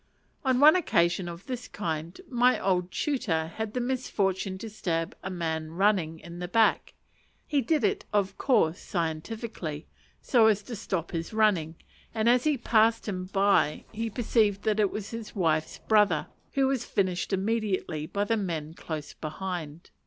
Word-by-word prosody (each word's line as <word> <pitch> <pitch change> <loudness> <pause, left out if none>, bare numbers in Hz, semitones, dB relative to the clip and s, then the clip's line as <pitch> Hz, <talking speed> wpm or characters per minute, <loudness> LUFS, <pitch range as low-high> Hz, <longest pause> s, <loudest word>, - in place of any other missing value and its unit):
On 260 -2 +2
one 305 +4 +8
occasion 175 - +2
of 170 +2 -9
this 250 -2 -5
kind 165 -3 -4
my 250 0 +3
old 180 -2 0
tutor 195 - -1
had 220 0 -4
the - - +1
misfortune 200 -7 -1
to 225 - -7
stab 165 -6 -2
a 190 - -5
running 165 +1 0
man - - -15
in 170 +1 -9
the 180 - -4
back: 225 +4 +2 0.5
he 290 -2 +1
did 305 -2 +1
it 205 - +1
of 200 -2 +1
course 185 - +2
scientifically, 165 -1 -4 0.3
so 230 -4 +4
as 210 -1 +2
to 235 - -6
stop 185 -5 -3
his 165 +3 -4
running; 190 -8 +2 0.4
and 220 0 +1
as 245 +2 +4
he 300 -2 +3
passed 225 -1 +3
him 185 -3 -3
by 195 -6 +2
he 225 +1 -3
perceived 215 -3 +1
it 210 -2 +3
was 210 +1 -6
his 230 -1 -7
wife's 160 -4 0
brother, 210 -2 +3 0.3
who 275 -1 +3
was 265 -2 0
finished 185 -4 -1
immediately 195 -6 -1
by 200 +4 -1
the 225 +2 +1
men 165 -6 -3
close 155 -3 -6
behind. 165 -1 -6
195 Hz, 160 wpm, -28 LUFS, 170-225 Hz, 0.5 s, one